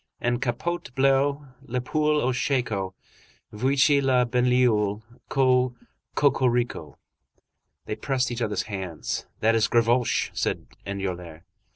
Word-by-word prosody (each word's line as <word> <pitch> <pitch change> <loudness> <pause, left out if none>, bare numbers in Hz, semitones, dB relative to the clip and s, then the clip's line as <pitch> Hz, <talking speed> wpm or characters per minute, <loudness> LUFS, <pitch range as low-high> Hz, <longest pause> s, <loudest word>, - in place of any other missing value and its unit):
En 120 0 0
capote 135 +8 -2
bleue, 140 +1 +2 0.2
La 125 +1 -1
poule 150 +3 +1
au 130 - +2
shako, 110 -8 -1 0.6
Voici 135 +5 +3
la 130 -2 +3
banlieue! 120 -4 +2 0.3
Co 130 -2 +2 0.4
cocorico!54 120 - +1 0.9
They 105 - -3
pressed 130 +2 -1
each 120 0 -4
other's 105 -4 -1
hands. 95 -6 -5
"That 115 +1 +4
is 110 -1 +3
Gavroche," 120 +1 +2
said - - -2 0.2
Enjolras. 90 -4 -5
125 Hz, 110 wpm, -25 LUFS, 105-135 Hz, 0.9 s, That